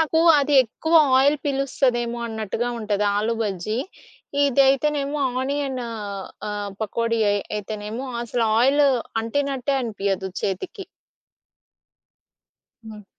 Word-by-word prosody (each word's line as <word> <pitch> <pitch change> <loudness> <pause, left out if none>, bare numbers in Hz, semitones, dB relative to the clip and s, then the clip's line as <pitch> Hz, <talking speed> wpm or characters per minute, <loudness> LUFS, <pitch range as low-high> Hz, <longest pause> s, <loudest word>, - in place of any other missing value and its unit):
నాకు 320 0 +2 0.2
అది 290 +1 +1
ఎక్కువ 320 +8 -3 0.2
ఆయిల్ 285 +3 +4
పిలుస్తదేమో 255 -4 0
అన్నట్టుగా 220 +1 -3
ఉంటది 210 -2 -1
ఆలూ 220 +3 0
బజ్జీ. 210 +2 -2 0.7
ఇదైతేనేమో 280 +2 +2 0.2
ఆనియన్ 270 -1 -2 0.7
ఆహ్, 205 -1 -4
పకోడీ 230 +2 -1
అయి 205 0 +1 0.2
అయితేనేమో 215 +4 -5 0.2
అసలు 235 0 -1
ఆయిల్ 275 +5 +4 0.4
అంటినట్టే 275 +2 -1
అనిపియదు 195 -4 -2
చేతికి. 355 - -4 2.0
హ్మ్. 215 -2 -10
240 Hz, 95 wpm, -23 LUFS, 215-275 Hz, 2.0 s, ఆయిల్